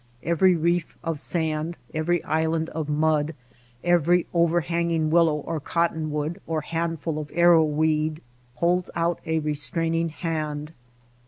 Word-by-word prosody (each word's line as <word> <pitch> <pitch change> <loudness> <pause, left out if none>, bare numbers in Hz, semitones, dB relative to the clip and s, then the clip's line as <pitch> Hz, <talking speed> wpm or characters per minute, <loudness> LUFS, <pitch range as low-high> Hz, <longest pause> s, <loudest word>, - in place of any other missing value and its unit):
Every 175 +2 +3
reef 170 0 0
of 165 -3 -2
sand, 160 +1 -2 0.2
every 165 +2 0
island 160 +1 0
of 155 -2 -4
mud, 155 0 +1 0.5
every 175 0 +3
THE - - -30
SILENT - - -31 0.2
RIVER 175 +1 +2
65 170 +1 -6
overhanging 170 -2 +1
willow 165 -2 +4
or 155 +2 -3
cottonwood 160 +1 -1
or 160 -1 -1
handful 165 -1 -2
of 150 -1 -6
arrow 170 -1 +6
weed 155 +1 0 0.3
holds 175 +1 +1
out 170 0 0
a 160 0 +1
restraining 165 +2 0
hand. 155 -2 -4
160 Hz, 145 wpm, -25 LUFS, 155-170 Hz, 0.5 s, arrow